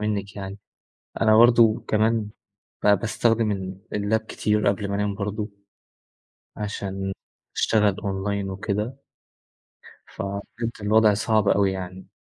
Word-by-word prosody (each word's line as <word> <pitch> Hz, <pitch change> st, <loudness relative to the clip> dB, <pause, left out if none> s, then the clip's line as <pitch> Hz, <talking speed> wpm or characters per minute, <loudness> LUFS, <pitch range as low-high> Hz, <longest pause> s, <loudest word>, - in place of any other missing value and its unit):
منِك 105 Hz, -1 st, -2 dB
يعني. 100 Hz, 0 st, -6 dB, 0.6 s
أنا 110 Hz, -1 st, +5 dB
برضه 115 Hz, -1 st, +6 dB
كمان 110 Hz, 0 st, +2 dB, 0.6 s
ب -, -, +5 dB
باستخدم 115 Hz, +1 st, +2 dB
ال 95 Hz, -1 st, -5 dB
اللاب 105 Hz, +2 st, +1 dB
كتير 105 Hz, -1 st, 0 dB
قبل 100 Hz, 0 st, -1 dB
ما 100 Hz, -, -2 dB
أنام 105 Hz, 0 st, 0 dB
برضه، 105 Hz, +1 st, -3 dB, 1.1 s
عشان 95 Hz, -2 st, -4 dB, 0.4 s
أشتغل 105 Hz, -3 st, +2 dB
أونلاين 100 Hz, 0 st, -2 dB
وكده. 105 Hz, +6 st, -3 dB, 1.1 s
ففهمتِ، 100 Hz, +3 st, -5 dB
الوضع 110 Hz, +1 st, +4 dB
صعب 110 Hz, 0 st, +1 dB
اوي 100 Hz, -1 st, +3 dB
يعني. 95 Hz, 0 st, -7 dB
105 Hz, 115 wpm, -24 LUFS, 100-110 Hz, 1.1 s, برضه